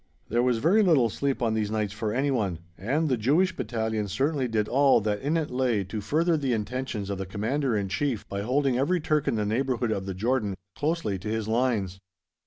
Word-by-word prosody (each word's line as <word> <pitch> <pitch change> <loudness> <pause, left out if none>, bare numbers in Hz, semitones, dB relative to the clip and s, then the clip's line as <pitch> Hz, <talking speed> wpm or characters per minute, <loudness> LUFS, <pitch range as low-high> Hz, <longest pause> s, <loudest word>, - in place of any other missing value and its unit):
There 120 +2 +2
was 125 -1 +2
very 175 - +4
little 145 - +4
sleep 135 -1 -1
on 115 -2 +1
these 110 -2 0
nights 105 -2 -1
for 105 0 -2
anyone, 120 - 0 0.2
and 140 - 0
the 130 -4 +1
Jewish 160 - +2
Battalion 110 -4 -2
certainly 135 - 0
did 110 -2 0
all 140 +1 +4
that 105 0 -1
in 150 +5 +1
it 155 -4 -2
lay 125 -5 +1
to 105 +3 -5
further 160 - +1
the 135 -4 0
intentions 110 -2 -3
of 100 - -3
the 95 - -3
Commander 115 +5 -1
in 100 -1 -1
Chief 115 +4 -2
by 100 0 -3
holding 130 +3 +1
every 175 +7 +2
Turk 150 -2 0
in - - +2
the 105 -1 0
neighbourhood 120 +1 0
of 100 -2 -2
the 95 - -3
Jordan 110 -1 0 0.2
closely 150 - -1
to 95 - -7
his 110 -1 -2
lines. 110 -5 0
120 Hz, 210 wpm, -27 LUFS, 105-140 Hz, 0.2 s, very